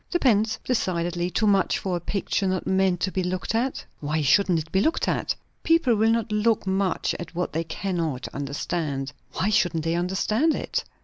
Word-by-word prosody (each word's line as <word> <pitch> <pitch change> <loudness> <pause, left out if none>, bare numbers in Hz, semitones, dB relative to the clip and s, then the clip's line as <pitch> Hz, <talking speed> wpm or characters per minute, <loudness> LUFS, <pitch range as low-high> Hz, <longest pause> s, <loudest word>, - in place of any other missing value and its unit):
"Depends. 225 - +2
Decidedly 175 -6 0
too 200 +5 0
much 200 -2 +3
for 185 -2 -2
a - - -1
picture 195 +2 -1
not 185 -1 -1
meant 190 -2 +2
to 190 - 0
be 185 - -1
looked 185 +3 -2
at?" 245 +4 -1
"Why 155 +1 -1
shouldn't 180 +5 +4
it 160 0 -5
be 190 - +3
looked 320 - +1
at?" - - 0 0.3
"People 330 -7 +3
will 220 +1 +3
not 230 -1 +1
look 210 0 +2
much 190 0 0
at 175 -1 -8
what 180 -2 -2
they 165 +1 0
cannot 165 -8 -3
understand." 145 0 -3 0.2
"Why 210 - 0
shouldn't 175 -6 +2
they 165 +1 0
understand 195 - +1
it?" - - -2
185 Hz, 185 wpm, -25 LUFS, 170-210 Hz, 0.3 s, shouldn't